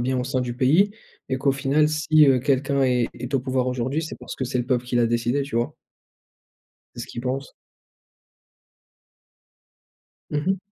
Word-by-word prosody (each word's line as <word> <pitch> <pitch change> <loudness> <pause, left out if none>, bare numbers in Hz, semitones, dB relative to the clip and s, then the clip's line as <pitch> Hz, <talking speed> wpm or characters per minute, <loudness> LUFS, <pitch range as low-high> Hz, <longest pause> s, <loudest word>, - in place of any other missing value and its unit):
bien 130 +1 0
au 125 - -1
sein 130 -1 -1
du 120 -1 -3
pays 165 +11 +4 0.4
et 130 - 0
qu'au 135 0 +2
final 140 +3 +2
si, 155 -1 +4
heu, 130 -2 +5
quelqu'un 140 0 +1
est 125 -2 +2
est 125 +3 -7
au 130 - +3
pouvoir 130 -1 0
aujourd'hui, 130 +5 -1
c'est 155 - -6
parce - - -8
que 130 - -3
c'est 125 0 -2
le 120 - -2
peuple 125 -2 0
qui 125 0 -2
l'a 120 -1 +4
décidé 120 +4 0
tu 140 -3 -7
vois? 120 - -1 1.2
C'est - - -7
ce - - -7
qu'ils 120 - -7
pensent. 130 +2 -3 2.8
Mmh 150 - 0
mh. 190 -1 +1
130 Hz, 185 wpm, -24 LUFS, 125-140 Hz, 2.8 s, heu